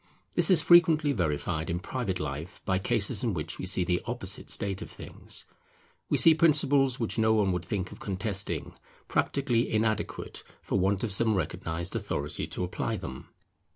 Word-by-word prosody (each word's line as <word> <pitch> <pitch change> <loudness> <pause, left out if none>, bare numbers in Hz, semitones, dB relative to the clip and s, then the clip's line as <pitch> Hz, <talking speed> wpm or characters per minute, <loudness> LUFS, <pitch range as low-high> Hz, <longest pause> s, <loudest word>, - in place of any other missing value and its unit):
This - - +3
is 185 - +5
frequently 160 -4 +5
verified 80 - -2
in 85 - -1
private 95 -2 -3
life 75 +4 -5
by 95 -1 +1
cases 110 +4 0
in 115 -6 0
which 75 - -4
we 90 - -3
see 95 -1 +3
the 90 0 0
opposite 115 -5 -2
state 100 -1 -1
of - - -7
things; - - -6 0.6
we - - +2
see 165 - +8
principles 140 -5 +3
which 115 -1 -1
no 110 0 +4
one 100 -3 +2
would 90 -2 -2
think 90 0 -3
of - - -11
contesting, 100 0 -2 0.3
practically 125 -4 0
inadequate, 110 -1 -2 0.2
for - - 0
want 95 +1 +1
of 110 -4 -1
some 110 +1 +2
recognized 85 -1 -3
authority 70 0 -3
to - - -4
apply 90 - -2
them. 65 - -8
100 Hz, 170 wpm, -28 LUFS, 90-120 Hz, 0.6 s, see